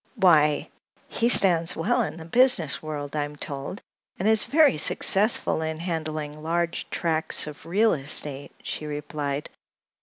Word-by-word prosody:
"Why, 155 Hz, -, +2 dB, 0.4 s
he 235 Hz, -, 0 dB
stands 175 Hz, -7 st, +6 dB
well 165 Hz, -, 0 dB
in -, -, -4 dB
the 160 Hz, -, -10 dB
business 175 Hz, -, +3 dB
world, 150 Hz, -2 st, -7 dB
I'm 145 Hz, 0 st, -4 dB
told, 145 Hz, +5 st, -8 dB, 0.3 s
and 190 Hz, -, -2 dB
is 220 Hz, -1 st, +3 dB
very 295 Hz, -, +3 dB
successful 200 Hz, 0 st, +2 dB
in 160 Hz, 0 st, -4 dB
handling 155 Hz, -3 st, -5 dB
large 170 Hz, +2 st, -3 dB
tracts 160 Hz, -2 st, -1 dB
of 150 Hz, +1 st, -11 dB
real 210 Hz, +6 st, +2 dB
estate," 140 Hz, -1 st, -3 dB
she 155 Hz, -, -6 dB
replied. 145 Hz, -1 st, -5 dB
160 Hz, 140 wpm, -24 LUFS, 150-180 Hz, 0.4 s, stands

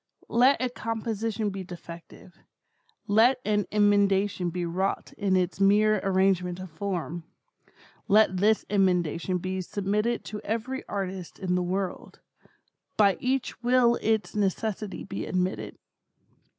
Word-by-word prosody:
Let 255 Hz, +4 st, +5 dB
a 255 Hz, -, +1 dB
composition 225 Hz, -2 st, -3 dB
be 195 Hz, -1 st, -5 dB
defective; 170 Hz, 0 st, -12 dB, 0.7 s
let 230 Hz, +5 st, +4 dB
an 210 Hz, -1 st, +1 dB
emendation 205 Hz, -2 st, +2 dB
be 175 Hz, +1 st, -3 dB
wrought 185 Hz, +3 st, -2 dB
in 195 Hz, -2 st, +1 dB
its 180 Hz, 0 st, -1 dB
mere 210 Hz, +2 st, +4 dB
arrangement 185 Hz, -2 st, +1 dB
of 185 Hz, -2 st, -8 dB
form; 175 Hz, -1 st, -4 dB, 0.8 s
let 205 Hz, -3 st, +4 dB
this 210 Hz, +3 st, +2 dB
emendation 180 Hz, -2 st, +1 dB
be 185 Hz, +1 st, -3 dB
submitted 210 Hz, +5 st, -1 dB
to 210 Hz, -, -6 dB
every 230 Hz, +5 st, -3 dB
artist 190 Hz, -3 st, -5 dB
in 185 Hz, -2 st, -2 dB
the 180 Hz, -, +1 dB
world; 185 Hz, +1 st, -4 dB, 0.8 s
by 200 Hz, -3 st, +5 dB
each 260 Hz, -1 st, -2 dB
will 245 Hz, -1 st, +3 dB
its 220 Hz, -1 st, 0 dB
necessity 210 Hz, 0 st, -2 dB
be 195 Hz, 0 st, -5 dB
admitted. 185 Hz, 0 st, -2 dB
200 Hz, 125 wpm, -27 LUFS, 185-215 Hz, 0.8 s, Let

